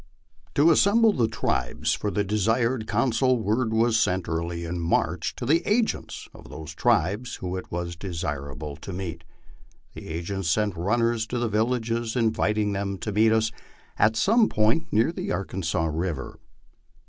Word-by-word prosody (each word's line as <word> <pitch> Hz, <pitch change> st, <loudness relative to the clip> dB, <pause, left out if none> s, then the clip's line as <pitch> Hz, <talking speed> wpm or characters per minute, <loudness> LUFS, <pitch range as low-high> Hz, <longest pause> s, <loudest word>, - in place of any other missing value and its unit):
To 155 Hz, +4 st, +5 dB
as -, -, +5 dB
semble 220 Hz, +2 st, +4 dB
the 120 Hz, -4 st, +2 dB
tribes -, -, -1 dB
for 105 Hz, -, -2 dB
the 105 Hz, 0 st, 0 dB
desired 110 Hz, +3 st, 0 dB
council, 125 Hz, +3 st, +2 dB
word 110 Hz, +2 st, 0 dB
was 115 Hz, 0 st, +3 dB
sent 95 Hz, -4 st, 0 dB
early 85 Hz, +1 st, -3 dB
in 85 Hz, +1 st, -3 dB
March 85 Hz, 0 st, 0 dB
to -, -, -5 dB
the 160 Hz, +6 st, +3 dB
agents 220 Hz, +4 st, -1 dB
of -, -, -14 dB
those 80 Hz, 0 st, -8 dB
tribes 100 Hz, +10 st, +1 dB
whom 90 Hz, 0 st, -4 dB
it 95 Hz, -, -7 dB
was 85 Hz, 0 st, -3 dB
desirable 75 Hz, -5 st, -5 dB
to 100 Hz, -, -8 dB
meet. 85 Hz, -3 st, -5 dB, 0.7 s
The -, -, -10 dB
agents 85 Hz, +2 st, -3 dB
sent 105 Hz, +3 st, +1 dB
runnel 115 Hz, +6 st, +1 dB
to 115 Hz, +3 st, -2 dB
the 120 Hz, 0 st, 0 dB
villages 115 Hz, +1 st, -1 dB
inviting 110 Hz, -3 st, +1 dB
them 100 Hz, 0 st, -2 dB
to 105 Hz, -, -4 dB
meet 110 Hz, +2 st, +4 dB
us 110 Hz, 0 st, +2 dB, 0.5 s
at 110 Hz, +1 st, +4 dB
some 220 Hz, -, +4 dB
point 115 Hz, +10 st, +1 dB
near 115 Hz, +8 st, +3 dB
the -, -, -4 dB
Arkansas 90 Hz, -2 st, -1 dB
river. 80 Hz, -3 st, -3 dB
105 Hz, 160 wpm, -25 LUFS, 85-115 Hz, 0.7 s, To